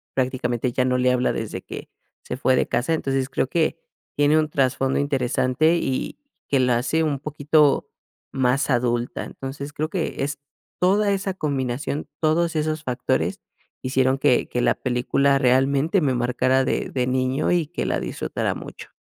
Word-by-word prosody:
prácticamente 125 -2 -1
ya 125 - +1
no 125 0 +1
le 125 0 +3
habla 125 0 +1
desde - - -4
que - - -8 0.3
se - - -4
fue 130 -1 +3
de - - +1
casa. 140 +7 0
Entonces, 135 -3 -1
creo 135 - 0
que 160 +3 0 0.4
tiene 145 +2 +4
un 155 -1 0
trasfondo 135 -1 +1
interesante, 135 +3 +1
y 130 -6 -2 0.3
que 140 - +3
la 125 -2 +3
hace 160 +6 0
un 145 -3 -1
poquito 150 0 +2 0.4
más 130 +2 +1
adulta. 120 -1 0
Entonces 140 +2 -7
creo 155 +1 -2
que 170 -5 -2
es 145 +1 -3 0.4
toda 200 +3 +3
esa 195 -1 -1
combinación, 140 -2 -2
todos 165 +1 +2
esos 155 0 -1
factores 125 -4 -1 0.4
hicieron 130 0 +1
que 125 - +3
que 125 - -1
la - - +3
película 135 +2 +1
realmente 135 +7 +3
me 140 -4 +2
marcara 125 +2 +2
de - - -1
de 125 -2 -1
niño, 130 +2 0
y 175 -4 +2
que 175 - -4
la - - 0
disfrutara - - -3
mucho. - - -9
135 Hz, 165 wpm, -23 LUFS, 130-155 Hz, 0.4 s, tiene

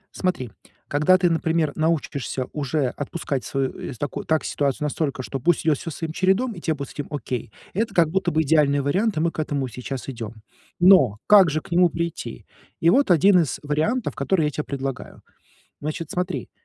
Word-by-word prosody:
Смотри, 175 - -2 0.4
когда 150 +6 +4
ты, 180 -1 +2
например, 165 -1 +1
научишься 150 -5 -1
уже 145 -2 0
отпускать 145 0 -4
свою, 135 -1 -1
э, - - -5
с - - -13
такую 145 - -4
так 160 -1 +1
ситуацию 140 0 -1
настолько, 140 -3 -2
что 135 - -4
пусть 170 +5 +1
идет 155 -3 +3
всё 165 - -6
своим 160 +1 -5
чередом 190 +8 +2
и 175 - -10
те 160 - 0
будет 140 -1 -6
с - - -12
этим 145 - -5
окей, 125 -7 -4 0.2
это 220 +1 -1
как 165 -3 +4
будто 185 +1 0
бы 160 0 +2
идеальный 145 -2 +3
вариант, 190 +9 0
и - - +2
мы 165 +1 +1
к - - -8
этому 145 -3 -1
сейчас 125 +2 -6
идем. 115 -3 -6 0.4
Но 175 - +6
как 200 -4 +7
же 155 +1 -1
к - - -17
нему 175 +1 +5
прийти? 170 0 -5 0.3
И 165 - +4
вот 275 -1 +3
один 180 +2 +6
из 155 -8 -1
вариантов, 155 - 0
который 180 -5 +1
я 150 - 0
тебе 150 +1 -4
предлагаю. 135 -1 -5 0.6
Значит, 155 +2 -4
смотри: 180 0 -3
155 Hz, 200 wpm, -23 LUFS, 140-175 Hz, 0.6 s, как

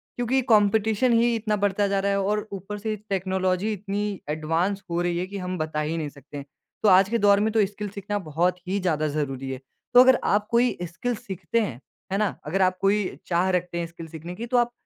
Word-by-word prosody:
क्योंकि 245 +2 +1
कॉम्पिटिशन 220 +3 +3
ही 235 +1 +3
इतना 215 -1 0
बढ़ता 205 0 +1
जा 195 0 +1
रहा 200 +1 +1
है 200 - +1
और 210 +2 -1
ऊपर 200 +2 -6
से 215 +1 -3
टेक्नोलॉजी 190 +1 0
इतनी 205 0 -3
एडवांस 165 +6 -1
हो 170 +1 0
रही 175 -1 0
है 180 - -1
कि 200 +1 -6
हम 185 -1 -4
बता 155 -1 -2
ही 155 +2 -2
नहीं 155 -2 -3
सकते 145 +1 -12
हैं। 140 - -7 0.4
तो 210 - +6
आज 190 +1 +6
के 235 - +1
दौर 200 -2 +5
में 215 +2 +1
तो 220 -2 +4
स्किल 205 +1 -6
सीखना 205 +1 -4
बहुत 175 +1 0
ही 195 +2 0
ज़्यादा 155 -5 0
ज़रूरी 135 -3 -3
है, 130 - -5 0.3
तो 245 - +10
अगर 260 0 +5
आप 210 +1 +1
कोई 240 +1 +3
स्किल 235 +8 -3
सीखते 200 +2 -3
हैं, 130 - -3 0.3
है 195 - +1
ना? 205 -3 0
अगर 190 +6 0
आप 185 0 +3
कोई 200 +1 +2 0.2
चाह 175 +1 +2
रखते 180 -1 -1
हैं 170 - -2
स्किल 165 0 -10
सीखने 165 +2 -8
की 225 +5 -5
तो 250 +1 +1
आप 240 0 +2
195 Hz, 230 wpm, -25 LUFS, 170-210 Hz, 0.4 s, तो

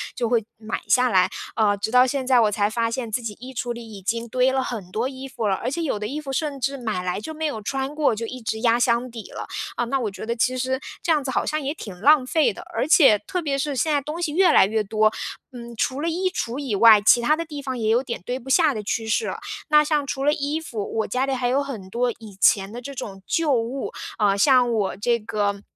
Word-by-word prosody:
就 240 - -1
会 235 -2 +2
买 220 0 -5
下 250 -1 +4
来。 185 -4 +3 0.3
呃， 210 -2 +3
直 205 +2 -3
到 250 +1 +6
现 270 0 -2
在 255 -1 +4
我 215 -2 +3
才 205 0 +1
发 230 +1 0
现 230 -2 -4
自 245 +3 -1
己 225 -2 -5
衣 260 +2 -9
橱 240 0 -3
里 230 -1 -10
已 200 -2 -9
经 230 +4 -2
堆 255 +3 +2
了 265 0 0
很 210 -8 -6
多 225 +6 -1
衣 265 0 -7
服 230 -4 -3
了， 195 - +2
而 235 - -3
且 335 +6 -3
有 275 -9 -1
的 210 - -3
衣 290 +6 -4
服 290 -3 -6
甚 290 -1 -2
至 275 +2 -1
买 215 -7 -3
来 180 +1 -2
就 315 +9 -7
没 315 0 -4
有 255 -8 -3
穿 270 +6 -3
过， 295 -7 +2
就 230 +2 -4
一 255 +2 -7
直 220 0 -3
压 235 0 +3
箱 240 +1 +1
底 230 -2 -9
了。 - - -7 0.3
啊， 240 - -1
那 270 +3 -1
我 220 -5 -2
觉 195 - -8
得 235 +1 -2
其 255 +2 +1
实 260 +1 -1 0.2
这 340 - 0
样 300 -3 +2
子 260 - -3
好 - - 0
像 310 0 -1
也 280 +1 -2
挺 200 - -9
浪 290 +1 +5
费 315 +4 +2
的， - - -10
而 - - 0
且 270 - +6
特 350 - -4
别 285 -4 -1
是 280 +1 -2
现 310 +4 +1
在 290 - +2
东 300 +5 -5
西 310 -4 -1
越 370 +2 +5
来 - - +6
越 215 +2 0
多， 215 +1 +2 0.4
嗯， 235 -2 -9
除 265 +5 -1
了 330 - 0
衣 365 +3 0
橱 245 -9 -3
以 265 -7 -2
外， 215 0 +7
其 230 +3 +5
他 300 +6 +3
的 335 +1 -4
地 295 -3 -7
方 260 -2 -4
也 220 -2 -1
有 235 +3 +3
点 235 -8 -5
堆 250 +1 -3
不 265 +1 -11
下 310 +1 +4
的 215 - -4
趋 225 +2 -2
势。 330 - 0 0.3
那 300 0 +6
像 300 -1 0
除 270 0 -3
了 295 +1 +3
衣 290 +2 -2
服， 225 -10 -5
我 220 - 0
家 255 +1 0
里 275 - -1
还 250 -1 -1
有 265 +3 +2
很 225 -9 -7
多 240 +4 0
以 220 -3 -12
前 195 0 +4
的 240 +2 -7
这 280 +3 -7
种 195 -6 -7
旧 320 -4 +1
物， 245 +3 -2 0.3
啊， 205 -2 +3
像 250 +1 +4
我 210 -5 -1
这 235 +3 +1
个， 205 -2 -2
245 Hz, 295 characters per minute, -23 LUFS, 220-275 Hz, 0.4 s, 外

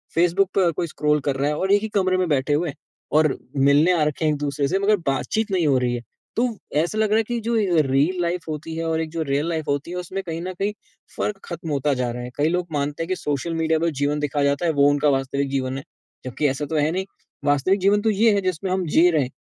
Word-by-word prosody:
Facebook 175 +3 +3
पे 190 - +4
हर 170 - +3
कोई 170 - -1
scroll 150 -1 +1
कर 135 - 0
रहा 140 +2 +1
है 150 - -1
और 190 +1 +1
एक 205 - +4
ही 220 - -3
कमरे 185 0 +2
में 185 -1 +1
बैठे 145 0 +1
हुए, 150 -1 0 0.4
और 155 -1 +3 0.2
मिलने 140 +5 +5
आ 155 - +2
रखे 150 +1 -1
हैं 155 - +3
एक-दूसरे 145 -1 -1
से, 190 +6 0
मगर 205 +1 +3
बातचीत 210 +10 -1
नहीं 180 -4 +2
हो 135 -2 +4
रही 125 -1 0
है। 120 - -4 0.3
तो 235 - +2 0.3
ऐसा 170 +7 0
लग 215 -1 +2
रहा 215 - +3
है 225 - +3
कि 240 +2 -3
जो 230 +2 -1
ए 180 -7 +3
रील 145 +7 +1
लाइफ 175 +1 -1
होती 155 +1 -5
है 165 - -3
और 160 0 0
एक 160 - -4
जो 165 -1 -3
रियल 145 +4 +1
लाइफ 160 -2 -3
होती 145 +4 -1
है 180 - -4
उसमें 185 +2 -4
कहीं 165 -2 -5
न 185 +1 -4
कहीं 205 +1 0 0.4
फ़र्क 210 -2 -2
ख़त्म 170 -2 -6
होता 145 +1 +1
जा 125 -2 -1
रहा 120 +1 -6
है। 125 - -6
कई 150 +2 +2
लोग 180 0 -1
मानते 145 +2 -2
हैं 165 - -6
कि 185 - +1
सोशल 150 +1 -2
मीडिया 160 -1 +1
पे 170 +1 +1
जीवन 145 +1 +1
दिखाया 145 0 -1
जाता 140 +4 +1
है, 165 - +3
वो 140 0 +4
उनका 145 +1 +2
वास्तविक 135 +1 0
जीवन 130 -1 -2
है, 135 - -7 0.4
जबकि 130 +4 0
ऐसा 135 +3 -2
तो 160 - -4
है 150 +1 +2
नहीं, 190 +2 -2 0.4
वास्तविक 145 +8 +2
जीवन 205 +2 +3
तो 220 - +1
ये 215 +1 +4
है 200 - +1
जिसमें 185 0 -2
हम 185 -1 0
जी 175 +2 +6
रहे 150 -4 +2
हैं। 125 - -6
160 Hz, 275 wpm, -23 LUFS, 145-185 Hz, 0.4 s, जी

